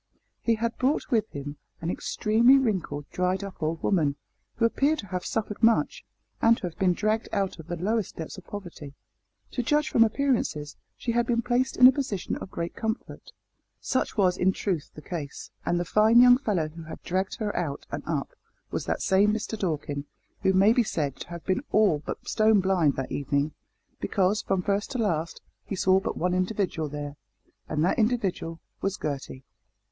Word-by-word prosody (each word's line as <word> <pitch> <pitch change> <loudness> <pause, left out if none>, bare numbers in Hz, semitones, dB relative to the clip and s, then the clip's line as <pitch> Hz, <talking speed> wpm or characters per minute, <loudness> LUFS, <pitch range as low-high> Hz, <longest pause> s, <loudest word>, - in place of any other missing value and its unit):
He 230 - +2
had 230 +1 -2
brought 265 +4 0
with 220 -3 +2
him 145 +1 -7 0.2
an 165 +1 -2
extremely 230 +8 +4
wrinkled, 185 - -1
dried 185 +2 0
up 195 -3 -8
old 160 +1 -2
woman, 155 -8 +2 0.4
who 230 - +2
appeared 280 +6 +2
to 215 - -6
have 180 -1 -3
suffered 215 -1 -3
much, 230 - +3 0.4
and 230 0 +5
to - - -14
have 175 -2 -4
been 185 -2 +3
dragged 215 +4 0
out 195 -3 -1
of 160 - -10
the 175 - -3
lowest 205 +4 -1
depths 160 - -6
of 190 - -12
poverty. 170 -8 -8 0.6
To 250 - -1
judge 295 +5 +1
from 230 - +5
appearances 220 - 0 0.2
she 235 - -2
had 235 0 +1
been 235 -1 +1
placed 245 +2 0
in 250 - +8
a 255 - +11
position 250 -9 -2
of - - -8
great 170 -1 -4
comfort. 220 +1 -4 0.5
Such 260 - -1
was 185 -3 +3
in 190 +1 +3
truth 180 -8 -2
the 150 - -10
case, 155 -6 -6 0.2
and 175 - +2
the 175 - -1
fine 215 +5 +5
young 245 0 +8
fellow 190 - 0
who 165 +1 -10
had 160 - -9
dragged 190 +2 -1
her 210 -2 -3
out 150 -5 -3
and - - -3
up - - -1 0.4
was - - -2
that - - -1
same 200 +1 +4
Mister 220 +1 -2
Dorkin, 150 -7 -2 0.4
who 190 - +3
may 195 +4 +5
be 245 - +4
said 150 - -1
to - - -9
have 170 -1 -8
been 185 +4 +1
all 205 -8 +4
but - - -6
stone 215 -1 +4
blind 180 -7 +2
that 135 - -4
evening, 140 +2 0 0.5
because, 195 +1 +1
from 190 -2 -1
first 200 +1 0
to - - -2
last, 170 -8 -1 0.2
he 195 - -4
saw 190 +1 +4
but - - -4
one 180 +1 0
individual 185 -4 -1
there, 145 0 -6 0.5
and 155 +1 +1
that 185 - +1
individual 200 -8 0 0.2
was 195 0 -1
Gertie. 135 -2 -5
190 Hz, 195 wpm, -27 LUFS, 165-225 Hz, 0.6 s, a